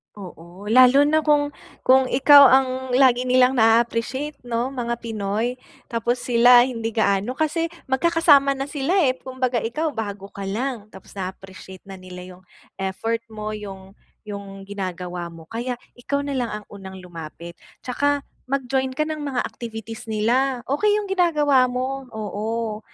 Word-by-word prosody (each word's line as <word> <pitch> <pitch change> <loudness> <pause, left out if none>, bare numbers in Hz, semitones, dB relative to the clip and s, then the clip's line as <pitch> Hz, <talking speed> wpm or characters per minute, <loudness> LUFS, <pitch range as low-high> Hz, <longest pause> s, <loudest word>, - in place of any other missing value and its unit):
Oo, 180 +1 -10
lalo 255 +4 +6
na 310 0 +2
kung 295 -1 +3 0.3
kung 260 +1 +5
ikaw 280 +2 +7
ang 265 +1 +5 0.3
lagi 255 -1 +4
nilang 255 0 +3
na-a-appreciate 235 +5 +1
'no, 240 +1 -1
mga 245 -3 -3
Pinoy. 225 +2 -2 0.3
Tapos 240 +1 -1
sila 245 0 +6
hindi 230 -3 -2
gaano 205 +1 +1
kasi 315 +4 -1 0.2
magkakasama 290 -1 +4
na 275 +1 -5
sila, 285 +4 -1 0.2
eh, 255 - -2
kumbaga 255 -1 -2
ikaw 270 +9 -2
bago 205 -6 -6
ka 200 -1 -8
lang, 225 +2 -3
tapos 190 +1 -14
na-a-appreciate 190 0 -8
na 195 - -8
nila 185 -1 -10 0.2
yung 185 - -23 0.3
effort 225 +4 -3
mo, 215 -1 -6
yung 195 -1 -10 0.3
yung 200 -2 -8
ginagawa 180 -3 -5
mo, 165 -1 -14
kaya 240 +2 -3 0.2
ikaw 280 +3 -2
na 280 -2 -3
lang 245 - -1
ang - - -21
unang 190 -1 -10
lumapit. 170 0 -10 0.2
Tsaka 285 +3 0 0.2
mag-join 265 0 -1
ka 305 - 0
ng 310 - -4
mga 275 -4 -2
activities 225 -1 -8
nila. 245 +4 +1
Okey 410 +10 +2
yung 415 -2 -3
ginagawa 300 -8 +3
mo, 260 +2 -3
oo, 215 +1 -3
240 Hz, 150 wpm, -22 LUFS, 205-270 Hz, 0.3 s, ikaw